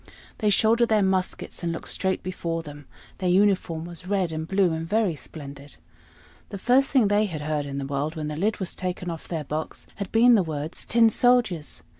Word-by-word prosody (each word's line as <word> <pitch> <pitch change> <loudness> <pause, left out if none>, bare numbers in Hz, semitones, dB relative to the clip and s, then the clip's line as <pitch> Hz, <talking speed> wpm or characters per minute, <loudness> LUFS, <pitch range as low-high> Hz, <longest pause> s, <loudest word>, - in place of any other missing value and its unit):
They 210 - +2
shouldered 225 +3 +3
their 215 -2 +3
muskets, 190 -1 -1
and 170 -1 -1
looked 165 - -6
straight 190 -1 0
before 170 -2 -3
them; 145 -2 -11 0.3
their 185 -2 0
uniform 180 -4 +2
was 175 +1 -9
red 190 -4 0
and 160 0 -4
blue, 190 -3 +2
and 160 0 -3
very 210 -2 +1
splendid. 140 0 -10 0.7
The 200 - -6
first 255 +7 +3
thing 255 -7 +4
they 205 +1 +3
had 160 -5 -5
heard 150 -1 -2
in 140 0 -5
the 140 - -3
world, 140 +3 -2
when 155 -1 -4
the 150 - -4
lid 205 +7 0
was 190 -3 -2
taken 180 -1 -4
off 165 - -8
their 160 -3 -3
box, 155 +2 -5
had 200 -2 -5
been 240 +2 +6
the 215 - +5
words 155 -1 -4
"Tin 230 0 +5
soldiers!" 225 -9 +2
180 Hz, 205 wpm, -25 LUFS, 155-205 Hz, 0.7 s, been